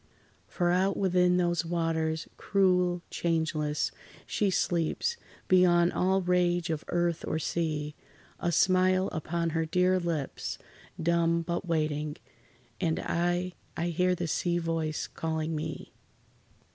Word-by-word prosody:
For 175 -2 0
out 190 +2 +2
within 180 -2 +3
those 175 -2 +1
waters, 165 -1 -1
cruel, 180 -3 +2
changeless, 155 -3 0 0.3
She 205 - 0
sleeps, 175 - 0 0.3
beyond 175 -2 +5
all 190 +1 +2
rage 175 -1 +1
of 155 -1 -3
earth 175 -1 0
or - - 0
sea; 155 -2 -2 0.5
A 175 - 0
smile 185 +2 +3
upon 165 +1 -2
her 165 +1 0
dear 180 +2 +3
lips, 165 -5 -3 0.4
dumb, 170 0 +2
but 170 +2 -3
waiting, 155 -2 -1 0.6
And 165 -4 0
I—I 175 -1 -2
hear 180 +2 +2
the 175 - -3
sea 175 +2 0
voice 165 -2 -2
calling 160 0 -3
me. 155 0 -5
170 Hz, 120 wpm, -29 LUFS, 160-180 Hz, 0.6 s, beyond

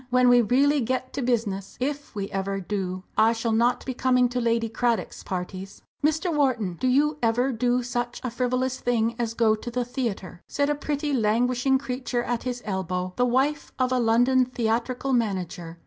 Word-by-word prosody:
"When 250 0 +4
we 245 0 +6
really 275 +6 +3
get 255 +2 -2
to 275 - -3
business 220 -6 -1
if 285 +1 -3
we 200 -1 -3
ever 195 0 -2
do 185 -1 -3 0.2
I 225 +1 +5
shall 230 0 -2
not 235 +2 +2
be 260 - -3
coming 250 -1 +2
to 245 0 -2
Lady 230 -1 +1
Cradock's 230 0 -1
parties." 185 +1 -6 0.2
"Mr. 315 +3 +1
Wharton, 245 -10 +1
do 255 - +2
you 290 +4 +2
ever 245 +3 +2
do 245 +1 +1
such 240 0 -3
a 250 - -2
frivolous 255 +1 -1
thing 230 -1 +1
as 230 -1 -2
go 225 -2 +4
to 220 +3 -5
the 245 +1 -2
theatre?" 220 -8 -4
said 285 0 0
a - - +3
pretty, 290 0 -2
languishing 245 +3 +2
creature 250 -2 -3
at 240 -1 -2
his 245 -1 -4
elbow, 185 -2 -2
the 245 - +2
wife 275 +4 0
of 255 -1 +1
a 255 - +2
London 245 +3 +4
theatrical 245 +2 -1
manager. 185 -7 -2
245 Hz, 185 wpm, -25 LUFS, 220-255 Hz, 0.2 s, we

